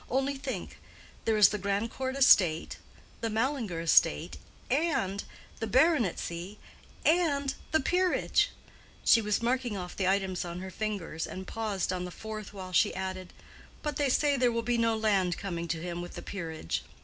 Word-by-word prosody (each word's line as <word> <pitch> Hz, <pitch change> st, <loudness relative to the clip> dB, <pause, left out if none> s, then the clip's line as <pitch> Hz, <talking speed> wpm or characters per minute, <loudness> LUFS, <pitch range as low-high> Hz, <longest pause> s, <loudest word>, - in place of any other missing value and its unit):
Only 270 Hz, +2 st, 0 dB
think: 270 Hz, -1 st, -6 dB, 0.5 s
there 220 Hz, -1 st, +2 dB
is 210 Hz, -, +8 dB
the 210 Hz, -, -3 dB
Grandcourt 225 Hz, +7 st, -2 dB
estate, 180 Hz, -12 st, +5 dB, 0.4 s
the 225 Hz, -, -2 dB
Mallinger 225 Hz, -, -1 dB
estate, 115 Hz, -, +3 dB, 0.3 s
and 255 Hz, -, +1 dB, 0.4 s
the 225 Hz, -, -2 dB
baronetcy, 210 Hz, -, +1 dB, 0.5 s
and 290 Hz, -5 st, +2 dB, 0.2 s
the 315 Hz, -, +4 dB
peerage,"—she 360 Hz, -7 st, +1 dB
was 210 Hz, +1 st, 0 dB
marking 245 Hz, -3 st, 0 dB
off 180 Hz, -1 st, -6 dB
the 190 Hz, -, 0 dB
items 190 Hz, -1 st, +1 dB
on 175 Hz, 0 st, -6 dB
her 190 Hz, 0 st, -6 dB
fingers, 190 Hz, -6 st, -3 dB
and 190 Hz, 0 st, -7 dB
paused 210 Hz, -4 st, -2 dB
on 180 Hz, 0 st, -3 dB
the -, -, -5 dB
fourth 215 Hz, +2 st, -7 dB
while 190 Hz, -2 st, -8 dB
she 220 Hz, +2 st, +3 dB
added, 185 Hz, -1 st, -5 dB, 0.5 s
"but 300 Hz, -1 st, -2 dB
they 285 Hz, -2 st, +1 dB
say 285 Hz, +2 st, +3 dB
there 245 Hz, -1 st, +3 dB
will 230 Hz, 0 st, -1 dB
be 240 Hz, 0 st, +1 dB
no 230 Hz, -1 st, +2 dB
land 195 Hz, -5 st, +1 dB
coming 170 Hz, -4 st, -4 dB
to 165 Hz, 0 st, -2 dB
him 175 Hz, +1 st, -4 dB
with 175 Hz, -, -8 dB
the -, -, -7 dB
peerage." 160 Hz, -, -4 dB
210 Hz, 160 wpm, -30 LUFS, 185-255 Hz, 0.5 s, is